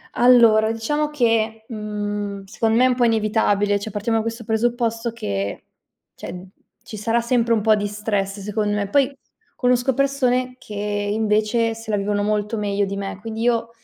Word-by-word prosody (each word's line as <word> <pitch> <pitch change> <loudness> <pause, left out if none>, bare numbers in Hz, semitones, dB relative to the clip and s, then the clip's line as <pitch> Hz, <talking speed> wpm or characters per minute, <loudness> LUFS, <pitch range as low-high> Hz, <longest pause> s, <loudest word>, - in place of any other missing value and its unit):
Allora 230 -3 +5
diciamo 295 +7 -1
che, 225 -5 0
mhmm, 205 -2 -4
secondo 220 +3 -1
me 245 - +4
è 255 - +6
un 250 - +1
po' 245 -1 +2
inevitabile, 210 -2 +2
cioè 215 +2 -6
partiamo 215 +3 -1
da 220 - 0
questo 230 +1 -5
presupposto 230 +1 -1
che, 100 - -4 0.5
cioè, - - -8 0.5
ci 225 -2 -9
sarà 230 +3 +1
sempre 235 -1 +1
un 220 - +2
po' 215 +1 +4
di 205 -1 -1
stress, 205 -1 -2
secondo 210 +1 -1
me. 205 -1 -1
Poi, 275 +3 +3 0.5
conosco 250 +1 +2
persone 255 -2 +1
che, 210 - -11
invece, 210 +2 0
se 225 -1 -7
la 205 - +1
vivono 205 +1 -1
molto 210 +1 -1
meglio 205 -1 0
di 200 0 -3
me. 195 -1 -5
Quindi 225 0 -5
io 230 -1 +1
220 Hz, 175 wpm, -21 LUFS, 205-235 Hz, 0.5 s, è